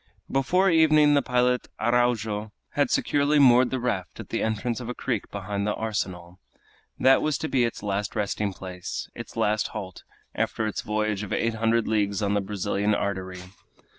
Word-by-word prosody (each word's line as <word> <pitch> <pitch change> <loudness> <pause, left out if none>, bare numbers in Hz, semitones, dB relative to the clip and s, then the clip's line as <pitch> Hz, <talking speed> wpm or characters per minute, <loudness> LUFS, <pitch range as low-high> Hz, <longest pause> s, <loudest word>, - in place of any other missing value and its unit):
Before 180 +8 +2
evening 155 -2 +5
the 140 - +4
pilot 125 -1 +1
Araujo 110 -3 +1 0.2
had 145 -3 +1
securely 145 +1 +2
moored 125 -2 +6
the 130 - -2
raft 110 -8 -3
at - - -8
the - - -2
entrance 110 +2 -1
of 120 -1 -6
a 125 - -4
creek 120 -6 -3
behind 100 0 -3
the 105 - 0
arsenal. 90 -5 -4 0.6
That 130 0 +5
was 155 -1 0
to 160 - -3
be 130 -5 +2
its 115 - -5
last 100 0 -2
resting 105 -1 -1
place, 90 -1 -6
its - - -9
last 105 +1 +1
halt, 95 -3 -7 0.3
after 110 - -1
its 105 - -2
voyage 105 -1 -1
of 105 - -6
eight 115 0 0
hundred 115 +1 +1
leagues 105 -2 0
on 100 0 +1
the 105 - +2
great 95 - -6
Brazilian 105 +1 0
artery. 95 -2 -3
110 Hz, 180 wpm, -26 LUFS, 100-125 Hz, 0.6 s, moored